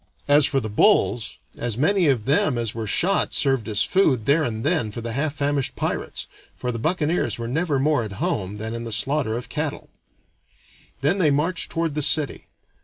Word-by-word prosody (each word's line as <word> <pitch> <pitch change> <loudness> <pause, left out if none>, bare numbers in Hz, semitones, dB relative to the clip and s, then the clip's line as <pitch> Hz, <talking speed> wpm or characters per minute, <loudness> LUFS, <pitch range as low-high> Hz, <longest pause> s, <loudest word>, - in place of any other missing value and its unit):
As 145 0 +6
for 135 - +1
the 110 - -4
bulls, 115 - +2 0.2
as 120 -2 -2
many 180 +5 +2
of 125 -7 +1
them 140 -1 +2
as 115 -3 -2
were 110 -1 -4
shot 190 - +1
served 135 -5 +1
as 105 -2 +2
food 140 - +2
there 145 +5 +3
and 115 -5 -3
then 150 -8 +1
for 105 - -7
the 115 0 -4
half 140 +5 -2
famished 145 -2 -1
pirates, - - -3 0.3
for 125 - -3
the 115 - -5
buccaneers 160 +4 0
were 115 0 -4
never 150 +3 0
more 145 -2 +2
at 105 -3 -6
home 95 0 -2
than 110 +2 -5
in 115 0 -5
the 115 - -6
slaughter 115 +1 0
of 125 - -7
cattle. 150 -1 -4 1.1
Then 155 +8 +1
they 165 -5 +4
marched 155 +5 0
toward 165 -2 -1
the 150 - -2
city. 145 +1 +1
140 Hz, 195 wpm, -23 LUFS, 115-155 Hz, 1.1 s, As